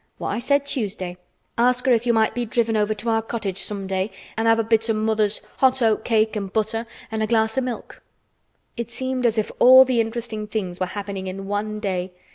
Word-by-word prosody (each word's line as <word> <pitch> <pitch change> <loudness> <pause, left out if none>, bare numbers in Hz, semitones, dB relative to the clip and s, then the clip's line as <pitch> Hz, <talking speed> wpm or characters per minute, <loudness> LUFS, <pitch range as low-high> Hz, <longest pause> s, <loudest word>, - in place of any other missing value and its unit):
"What - - -4
I - - -1
said 280 +3 +1
Tuesday. 200 -9 -3 0.4
Ask 250 +1 +3
her 260 - +5
if 235 +1 +1
you - - +5
might 220 -1 +2
be 245 - -2
driven 230 -1 0
over 215 0 +1
to 225 +3 -3
our 225 0 +2
cottage 215 -4 -4
some 200 -2 -5
day 190 +1 -1 0.3
and 225 +1 0
have 225 0 +5
a 225 - +1
bit 225 0 +1
o' - - +3
mother's 215 -1 +1
hot 265 -1 +3
oat 220 -2 +2
cake, 220 -1 +1
an' 200 -2 -2
butter, 220 +3 -2 0.2
an' 220 0 -2
a 215 - +1
glass 220 -1 +2
o' 265 - +2
milk." 250 -2 -6 0.7
It 235 -2 -4
seemed 260 +1 -1
as 225 -1 0
if 215 - 0
all 260 +1 +9
the 250 -3 +2
interesting 225 -1 -4
things 190 -5 -4
were 185 - 0
happening 195 0 -5
in 195 +1 -6
one 210 +1 -3
day. 185 -3 -3
220 Hz, 225 wpm, -23 LUFS, 205-235 Hz, 0.7 s, all